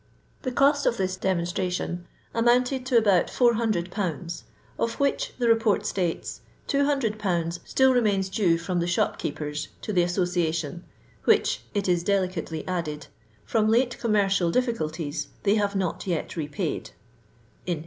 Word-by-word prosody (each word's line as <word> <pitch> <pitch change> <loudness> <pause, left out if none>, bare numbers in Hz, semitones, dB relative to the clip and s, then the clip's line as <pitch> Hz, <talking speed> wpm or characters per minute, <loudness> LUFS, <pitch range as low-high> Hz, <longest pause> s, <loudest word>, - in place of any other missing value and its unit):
The 255 - -2
cost 280 +2 +3
of 235 - +2
this 185 -2 -1
demonstration 180 -1 -2 0.3
amounted 250 +3 +2
to 255 -3 +4
about 200 -6 +4
4002., 185 - 0 0.4
of 230 0 -1
which, 280 -1 0
the 245 - 0
lleport 225 -2 +3
states, 175 -4 -2
" - - -34
200/. 215 - 0
still 265 0 +4
remains 205 -6 +2
due 190 -4 +2
from 175 +1 -2
the 170 - 0
shop 175 - 0
keepers 150 0 -3 0.2
to 215 - -3
the 180 - +4
Association; 175 -2 -1 0.4
which, - - +3
it 200 -1 0
is 175 -1 +2
delicately 180 -4 -1
added, 155 -5 -3 0.4
''from 215 -1 +2
late 240 +2 +2
commercial 200 -5 +2
difficulties 160 - -1 0.2
they 200 - +4
have 205 -2 +1
not 190 0 -2
yet 170 -4 -2
repaid" 155 +1 -3 0.8
(in 175 - +1
1860). - - -8
190 Hz, 140 wpm, -26 LUFS, 170-230 Hz, 0.8 s, to